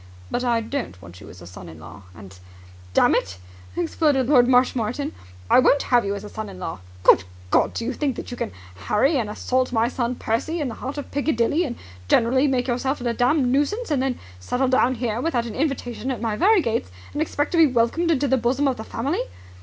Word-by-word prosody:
"But 250 Hz, -, -1 dB
I 235 Hz, -2 st, +1 dB
don't 225 Hz, -, -5 dB
want 90 Hz, -1 st, -13 dB
you -, -, -12 dB
as 90 Hz, 0 st, -13 dB
a -, -, -10 dB
son 90 Hz, -1 st, -11 dB
in 80 Hz, 0 st, -12 dB
law. 90 Hz, +5 st, -12 dB
And, 95 Hz, 0 st, -13 dB, 0.6 s
dammit," 95 Hz, -1 st, +2 dB, 0.4 s
exploded 265 Hz, -, +1 dB
Lord 250 Hz, -4 st, +6 dB
Marshmoreton, 250 Hz, +2 st, +1 dB, 0.4 s
"I -, -, +6 dB
won't 275 Hz, +2 st, +4 dB
have 245 Hz, -1 st, +3 dB
you 200 Hz, 0 st, -2 dB
as 200 Hz, -, -7 dB
a 210 Hz, -, -8 dB
son 215 Hz, -1 st, -6 dB
in 190 Hz, -, -10 dB
law! 175 Hz, -, -5 dB, 0.2 s
Good 95 Hz, -, +6 dB, 0.3 s
God! -, -, +2 dB
do 230 Hz, -, -3 dB
you 260 Hz, -, -2 dB
think 275 Hz, -1 st, -1 dB
that -, -, -7 dB
you -, -, -4 dB
can -, -, -3 dB, 0.4 s
harry 270 Hz, +8 st, +3 dB
and 225 Hz, -5 st, -1 dB
assault 255 Hz, +4 st, -1 dB
my 230 Hz, -1 st, +2 dB
son 245 Hz, 0 st, -2 dB
Percy 240 Hz, +10 st, -2 dB
in 290 Hz, -4 st, -1 dB
the -, -, -6 dB
heart 270 Hz, +3 st, -5 dB
of 290 Hz, -, -6 dB
Piccadilly 285 Hz, +2 st, +1 dB
and 240 Hz, -5 st, -4 dB, 0.3 s
generally 260 Hz, -, +3 dB
make 255 Hz, -2 st, 0 dB
yourself 265 Hz, +3 st, -1 dB
a 240 Hz, -1 st, -1 dB
damned 250 Hz, +2 st, +2 dB
nuisance 300 Hz, -, 0 dB
and 280 Hz, -3 st, +1 dB
then 265 Hz, -2 st, -1 dB, 0.2 s
settle 250 Hz, -, -1 dB
down 255 Hz, 0 st, +3 dB
here 235 Hz, -1 st, -2 dB
without 255 Hz, -7 st, 0 dB
an 230 Hz, -, -6 dB
invitation 265 Hz, -4 st, -2 dB
at 260 Hz, -, -2 dB
my 225 Hz, -2 st, -1 dB
very 390 Hz, -, +4 dB
gates 225 Hz, -, -1 dB, 0.2 s
and 295 Hz, -, -2 dB
expect 290 Hz, -2 st, -1 dB
to 340 Hz, -, +2 dB
be 320 Hz, -, +7 dB
welcomed 255 Hz, +7 st, +1 dB
into 290 Hz, -3 st, +2 dB
the 265 Hz, 0 st, +3 dB
bosom 255 Hz, +4 st, +1 dB
of 265 Hz, -, 0 dB
the 220 Hz, -, -6 dB
family? 270 Hz, +9 st, -2 dB
250 Hz, 225 wpm, -23 LUFS, 225-280 Hz, 0.6 s, be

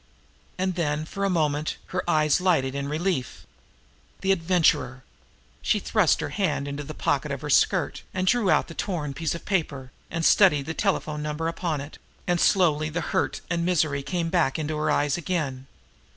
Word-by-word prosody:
And 185 Hz, 0 st, 0 dB
then, 155 Hz, -3 st, -1 dB
for 195 Hz, +5 st, -5 dB
a -, -, +1 dB
moment, 155 Hz, -4 st, 0 dB, 0.2 s
her 180 Hz, 0 st, 0 dB
eyes 155 Hz, +1 st, +3 dB
lighted 150 Hz, -8 st, +2 dB
in 140 Hz, 0 st, -3 dB
relief. 155 Hz, -3 st, -2 dB, 0.8 s
The 195 Hz, -, +2 dB
Adventurer! 165 Hz, -7 st, +2 dB, 0.6 s
She -, -, +2 dB
thrust -, -, +2 dB
her -, -, -3 dB
hand 140 Hz, -, -1 dB
into 140 Hz, +1 st, -4 dB
the -, -, -8 dB
pocket -, -, 0 dB
of -, -, -4 dB
her -, -, -3 dB
skirt, -, -, +2 dB
and 185 Hz, 0 st, -2 dB
drew 210 Hz, 0 st, +2 dB
out 155 Hz, -3 st, +3 dB
the 165 Hz, -, -9 dB
torn 160 Hz, -7 st, -3 dB
piece 160 Hz, +3 st, -2 dB
of 170 Hz, -, -9 dB
paper, 145 Hz, -9 st, -2 dB, 0.2 s
and 165 Hz, -1 st, -2 dB
studied 150 Hz, -9 st, +5 dB
the 160 Hz, -, -3 dB
telephone 160 Hz, -6 st, -1 dB
number 150 Hz, +2 st, -2 dB
upon 165 Hz, -3 st, -2 dB
it 145 Hz, +2 st, -10 dB, 0.3 s
and 175 Hz, -1 st, +1 dB
slowly 155 Hz, -5 st, +3 dB
the 170 Hz, +3 st, -2 dB
hurt -, -, 0 dB
and 170 Hz, -1 st, -1 dB
misery 155 Hz, -5 st, +1 dB
came 170 Hz, +3 st, -2 dB
back 165 Hz, -7 st, +2 dB
into 155 Hz, 0 st, -2 dB
her 155 Hz, 0 st, -1 dB
eyes 145 Hz, 0 st, +1 dB
again. 145 Hz, -7 st, -3 dB
155 Hz, 180 wpm, -25 LUFS, 145-180 Hz, 0.8 s, studied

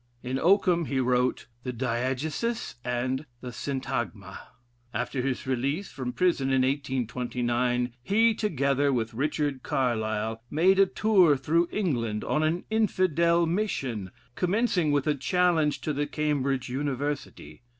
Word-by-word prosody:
In 130 Hz, +1 st, -2 dB
Oakham 180 Hz, -1 st, +3 dB
he 135 Hz, -2 st, -1 dB
wrote 125 Hz, 0 st, +1 dB, 0.2 s
"The 125 Hz, -, -4 dB
Diegesis" 130 Hz, -, -2 dB
and 130 Hz, +4 st, -2 dB, 0.2 s
"Syntagma." 125 Hz, -5 st, -4 dB, 0.6 s
After 125 Hz, +3 st, -1 dB
his 130 Hz, 0 st, -2 dB
release 135 Hz, +8 st, -1 dB
from 125 Hz, -2 st, -4 dB
prison 170 Hz, -4 st, +1 dB
in 130 Hz, -1 st, +3 dB
1829, 125 Hz, -2 st, -1 dB
he, 220 Hz, -, +3 dB
together 140 Hz, -, +1 dB
with 115 Hz, -3 st, -1 dB
Richard 145 Hz, +1 st, -1 dB
Carlile, 110 Hz, -4 st, -1 dB
made 185 Hz, +5 st, +3 dB
a 195 Hz, -, +6 dB
tour 185 Hz, -9 st, +4 dB
through 165 Hz, +6 st, +1 dB
England 120 Hz, -, -1 dB
on 150 Hz, -, 0 dB
an 160 Hz, +3 st, 0 dB
Infidel 170 Hz, -6 st, +2 dB
mission, 140 Hz, -, -2 dB, 0.2 s
commencing 180 Hz, -, +1 dB
with 145 Hz, -2 st, +1 dB
a 150 Hz, -, +2 dB
challenge 155 Hz, +2 st, +1 dB
to 155 Hz, -, -2 dB
the 145 Hz, +1 st, -1 dB
Cambridge 140 Hz, -4 st, -1 dB
University. 135 Hz, -, -4 dB
140 Hz, 125 wpm, -27 LUFS, 125-170 Hz, 0.6 s, a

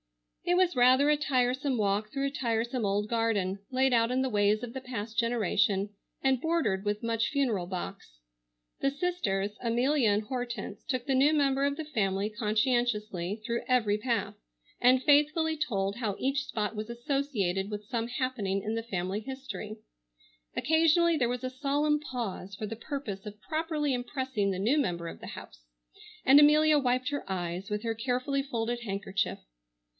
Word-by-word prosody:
It 355 Hz, 0 st, +2 dB
was 365 Hz, -4 st, +3 dB
rather 255 Hz, +4 st, +5 dB
a 300 Hz, -, +5 dB
tiresome 260 Hz, -2 st, +1 dB
walk 210 Hz, 0 st, 0 dB
through 275 Hz, 0 st, -1 dB
a 275 Hz, -, -1 dB
tiresome 235 Hz, -2 st, -1 dB
old 205 Hz, +1 st, 0 dB
garden, 215 Hz, -4 st, 0 dB
laid 260 Hz, 0 st, +2 dB
out 230 Hz, -1 st, +3 dB
in 255 Hz, +1 st, +1 dB
the 260 Hz, -, 0 dB
ways 210 Hz, 0 st, +2 dB
of 240 Hz, -1 st, -6 dB
the 265 Hz, -, -5 dB
past 230 Hz, -3 st, -6 dB
generation, 210 Hz, -3 st, +1 dB, 0.3 s
and 265 Hz, -2 st, +2 dB
bordered 320 Hz, -, 0 dB
with 205 Hz, +1 st, -2 dB
much 230 Hz, 0 st, 0 dB
funereal 235 Hz, -11 st, 0 dB
box. 175 Hz, -, -6 dB, 0.6 s
The 275 Hz, -, +2 dB
sisters, 275 Hz, -, -1 dB
Amelia 245 Hz, +2 st, +2 dB
and 205 Hz, +1 st, +2 dB
Hortense, 240 Hz, -3 st, -5 dB
took 255 Hz, -2 st, -2 dB
the 275 Hz, -, +1 dB
new 275 Hz, +3 st, +5 dB
member 275 Hz, -2 st, +2 dB
of 280 Hz, 0 st, +1 dB
the 315 Hz, -, -4 dB
family, 200 Hz, -7 st, 0 dB
conscientiously, 215 Hz, -3 st, 0 dB
through 235 Hz, -1 st, -1 dB
every 220 Hz, -5 st, +2 dB
path, 235 Hz, 0 st, -1 dB, 0.5 s
and 255 Hz, +1 st, +5 dB
faithfully 305 Hz, +3 st, +3 dB
told 200 Hz, -9 st, -1 dB
how 215 Hz, -5 st, -2 dB
each 275 Hz, +1 st, 0 dB
spot 215 Hz, -2 st, -3 dB
was 215 Hz, +2 st, -5 dB
associated 235 Hz, -, -1 dB
with 210 Hz, 0 st, -5 dB
some 230 Hz, 0 st, -2 dB
happening 240 Hz, -7 st, -2 dB
in 215 Hz, -, -2 dB
the 225 Hz, 0 st, -2 dB
family 190 Hz, -2 st, -2 dB
history. 260 Hz, -3 st, -7 dB, 0.8 s
Occasionally 330 Hz, +2 st, +4 dB
there 245 Hz, -6 st, +1 dB
was 245 Hz, +1 st, -3 dB
a 255 Hz, -, -1 dB
solemn 290 Hz, +3 st, +1 dB
pause 230 Hz, -9 st, -5 dB
for 215 Hz, -, -4 dB
the 225 Hz, -, -5 dB
purpose 225 Hz, -5 st, -5 dB
of 210 Hz, 0 st, -9 dB
properly 310 Hz, 0 st, -1 dB
impressing 245 Hz, -4 st, -1 dB
the 185 Hz, -1 st, -2 dB
new 245 Hz, +10 st, +2 dB
member 175 Hz, -10 st, -1 dB
of -, -, -8 dB
the -, -, -8 dB
house, -, -, -10 dB, 0.6 s
and 275 Hz, +2 st, +8 dB
Amelia 300 Hz, +1 st, +6 dB
wiped 255 Hz, -1 st, +1 dB
her 285 Hz, -, -2 dB
eyes 180 Hz, +2 st, -3 dB
with 210 Hz, +1 st, -2 dB
her 225 Hz, -1 st, 0 dB
carefully 255 Hz, +4 st, -1 dB
folded 240 Hz, -3 st, -2 dB
handkerchief. 195 Hz, -2 st, -2 dB
240 Hz, 170 wpm, -29 LUFS, 210-275 Hz, 0.8 s, and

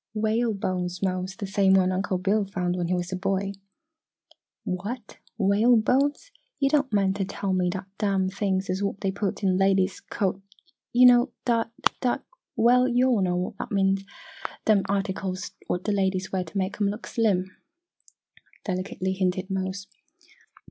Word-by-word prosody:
"Whale 220 Hz, +1 st, +1 dB
bones, 180 Hz, -1 st, -3 dB
Mose 185 Hz, 0 st, -1 dB
the 200 Hz, -, -5 dB
same 195 Hz, 0 st, +3 dB
one 185 Hz, -1 st, +4 dB
Uncle 185 Hz, 0 st, -1 dB
Bill 200 Hz, +3 st, +1 dB
found 180 Hz, -2 st, -1 dB
when 175 Hz, -1 st, -1 dB
he 180 Hz, -, +1 dB
was 175 Hz, +1 st, -3 dB
a -, -, -1 dB
boy." 195 Hz, +1 st, -1 dB, 1.1 s
"What! 205 Hz, +6 st, -5 dB, 0.2 s
Whalebones! 245 Hz, -, +3 dB, 0.3 s
Yo' 275 Hz, -, +3 dB
don' 285 Hz, -1 st, +2 dB
mean 195 Hz, -2 st, +2 dB
t' 200 Hz, 0 st, -2 dB
tell 195 Hz, 0 st, -3 dB
me 180 Hz, -1 st, +1 dB
dat 190 Hz, +2 st, -4 dB
dem 195 Hz, -3 st, +1 dB
things 195 Hz, 0 st, -1 dB
is 185 Hz, +2 st, -2 dB
what 200 Hz, 0 st, -2 dB
dey 195 Hz, -, 0 dB
puts 200 Hz, +1 st, -3 dB
in 185 Hz, -1 st, +3 dB
ladies 195 Hz, 0 st, +2 dB
co 195 Hz, -2 st, -2 dB, 0.5 s
yo' 250 Hz, +1 st, +6 dB
know, 245 Hz, +1 st, +6 dB
dat 230 Hz, -2 st, +1 dB, 0.3 s
dat 250 Hz, -2 st, 0 dB, 0.3 s
well, 250 Hz, +2 st, +5 dB
yo' 250 Hz, +1 st, +3 dB
all 225 Hz, -5 st, +2 dB
knows 180 Hz, -1 st, +1 dB
what -, -, -5 dB
Ah -, -, -3 dB
means! 195 Hz, -1 st, +1 dB, 0.6 s
Dem 210 Hz, -3 st, +4 dB
articles 195 Hz, -1 st, -2 dB, 0.2 s
what 180 Hz, -, -1 dB
d' -, -, -2 dB
ladies 190 Hz, -1 st, 0 dB
wear 190 Hz, -1 st, 0 dB
t' 165 Hz, +4 st, -7 dB
mek 195 Hz, +2 st, -2 dB
'em 200 Hz, -, +3 dB
look 210 Hz, +3 st, -5 dB
slim," 190 Hz, -5 st, 0 dB, 1.1 s
delicately 185 Hz, 0 st, -2 dB
hinted 185 Hz, 0 st, -1 dB
Mose. 190 Hz, +1 st, -3 dB
195 Hz, 165 wpm, -26 LUFS, 185-215 Hz, 1.1 s, yo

